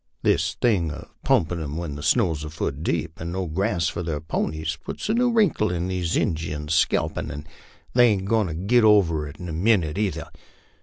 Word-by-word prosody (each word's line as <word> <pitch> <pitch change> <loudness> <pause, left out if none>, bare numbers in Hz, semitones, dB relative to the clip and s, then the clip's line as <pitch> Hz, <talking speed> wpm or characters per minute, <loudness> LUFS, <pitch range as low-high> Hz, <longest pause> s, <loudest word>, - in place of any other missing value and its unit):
This - - +2
thing 100 -9 +1
of 75 - -8
pump 80 - +2
in' 85 -2 -3
'em 75 0 -4
when 85 -4 -4
the 75 - -7
snow's 80 -2 +2
a 75 - -5
foot 75 -2 -4
deep, 80 -1 -2
and 85 +1 -4
no 95 +1 -2
grass 90 0 0
for 85 - -3
their 80 -4 -2
ponies, 80 +1 -2
puts - - -5
a - - +3
new 245 +1 +2
wrinkle 205 - +2
in 90 +1 -2
these 90 -2 -1
Injuns' 75 -3 -2
scalp, - - +1
an' 75 +1 -6 0.5
they 120 0 +6
ain't 100 -4 +1
goin' 110 0 +2
to 80 - -4
git 110 +8 +3
over 85 -8 +4
it 75 +1 -11
in 90 - -7
a 80 - -5
minnit 90 -2 +2
either. 90 -7 -2
85 Hz, 210 wpm, -24 LUFS, 80-100 Hz, 0.5 s, they